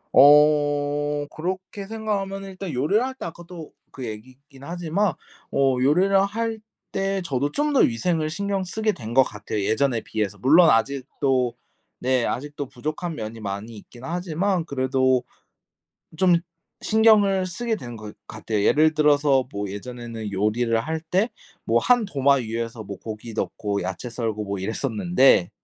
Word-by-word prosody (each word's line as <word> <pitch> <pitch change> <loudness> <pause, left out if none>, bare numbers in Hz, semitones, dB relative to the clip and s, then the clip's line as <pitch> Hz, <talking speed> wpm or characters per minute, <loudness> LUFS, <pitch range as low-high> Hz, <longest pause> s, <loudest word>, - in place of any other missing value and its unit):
어 145 0 +4
그렇게 185 +5 -5
생각하면은 195 -3 -3
일단 190 -2 -6
요리를 155 - +1
할 260 0 -4
때 - - -7
아까도 170 -1 -9 0.2
그 130 -3 -7
얘기긴 130 +5 -11
하지만 175 +4 -1 0.4
어 135 -2 +2
요리를 185 +8 +4
할 225 +2 -3 0.3
때 195 0 -1
저도 140 -1 -1
좀 295 0 0
더 275 - +4
위생을 155 +7 +1
신경쓰게 200 +3 -1
된 120 - -7
거 135 - +7
같아요. 105 -2 -5
예전에 115 +2 +1
비해서. 105 -2 -3
물론 160 +5 +6
아직도 130 +1 +1 0.4
네. 130 -1 +1
아직도 145 +2 -4
부족한 155 +5 -4
면이 110 +1 -6
많이 105 +2 -5
있긴 120 +4 -14
하지만 175 +3 -1
그래도 130 -2 +1 0.9
좀 180 +1 +4 0.5
신경을 210 -4 +4
쓰게 220 +6 -2
되는 120 - -8
것 105 -1 -9
같아요. 110 -2 -3
예를 155 +5 +4
들어서 145 -3 +3
뭐 100 0 -3
예전에는 115 +1 -7
요리를 115 +4 +1
할 160 +5 -3
때 185 +8 0 0.4
뭐 - - +3
한 245 -3 +3
도마 140 -6 +3
위에서 115 -2 -4
뭐 100 0 -7
고기 110 +1 -7
넣고 105 -2 -2
야채 95 +7 -5
썰고 110 -3 -3
뭐 100 0 -3
이랬었는데 115 - +2
145 Hz, 295 characters per minute, -24 LUFS, 115-180 Hz, 0.9 s, 거